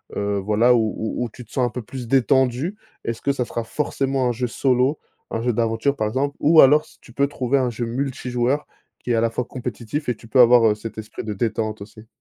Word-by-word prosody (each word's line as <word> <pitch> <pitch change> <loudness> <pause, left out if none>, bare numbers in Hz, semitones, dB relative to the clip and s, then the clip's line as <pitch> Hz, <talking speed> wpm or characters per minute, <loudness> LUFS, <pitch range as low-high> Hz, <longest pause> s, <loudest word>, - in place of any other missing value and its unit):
heu, 100 0 -1
voilà, 110 +5 +3
où 110 -4 +1 0.3
où - - -2
tu 125 - -10
te 115 - -23
sens 130 - +1
un - - 0
peu 125 - -5
plus 125 +2 -8
détendu? 130 - +2 0.3
Est-ce 115 -1 -3
que 140 - +1
ça 130 -3 -2
sera 115 - -4
forcément 135 0 -1
un - - +2
jeu 120 +1 -2
solo, 130 +4 +1 0.3
un 115 - -2
jeu 120 +1 0
d'aventure, 115 +4 0
par 110 -5 -1
exemple, 135 +6 -1
ou 155 +1 +6
alors 150 +3 +6
s - - -21
tu 120 - -16
peux 140 +3 +2
trouver 135 -1 0
un 125 -2 +1
jeu 120 +1 -3
multi-joueurs 130 +1 -1 0.3
qui - - -9
est, - - +3
à 115 - +2
la 115 0 +1
fois, 125 - -2
compétitif 125 +3 -5
et 125 - 0
tu 115 - -16
peux 130 - +2
avoir, 120 -1 +7
heu, 105 - +2
cet 110 +1 -8
esprit 105 - -7
de 110 - -4
détente 110 0 -2
aussi? 110 +2 -12
120 Hz, 240 wpm, -22 LUFS, 115-135 Hz, 0.3 s, avoir